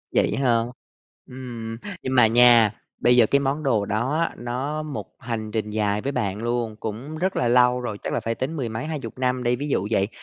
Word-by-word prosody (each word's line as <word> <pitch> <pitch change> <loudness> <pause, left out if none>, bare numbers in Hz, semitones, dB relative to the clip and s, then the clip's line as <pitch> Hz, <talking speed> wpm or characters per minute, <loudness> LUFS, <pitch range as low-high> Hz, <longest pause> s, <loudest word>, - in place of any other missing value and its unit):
Vậy - - +2
hả? 120 -4 +3 0.7
Ừm, 120 -3 -7 0.2
nhưng 130 0 -2
mà 120 - +7
nha, 120 -1 +6 0.3
bây 125 0 +4
giờ 120 -2 +6
cái 140 - +3
món 140 +2 -1
đồ 115 -8 +1
đó 120 +10 0
á, - - -15
nó 130 +6 -3
một 150 -3 -5
hành 115 -3 -4
trình 105 -1 -2
dài 105 -1 0
với 140 - -2
bạn 100 -4 -2
luôn, 120 -2 -1
cũng 120 +8 -5
rất 185 +3 -1
là 120 - +1
lâu 125 +1 +4
rồi, 115 -4 -4
chắc - - -3
là - - 0
phải 115 - -2
tính 135 +8 -3
mười 130 -5 -2
mấy 110 +3 -4
20 140 -7 -5
năm 125 -1 0
đi. 120 0 +1
Ví 145 +3 -4
dụ 100 -7 0
vậy, 100 -3 +2
120 Hz, 225 wpm, -24 LUFS, 110-130 Hz, 0.7 s, mà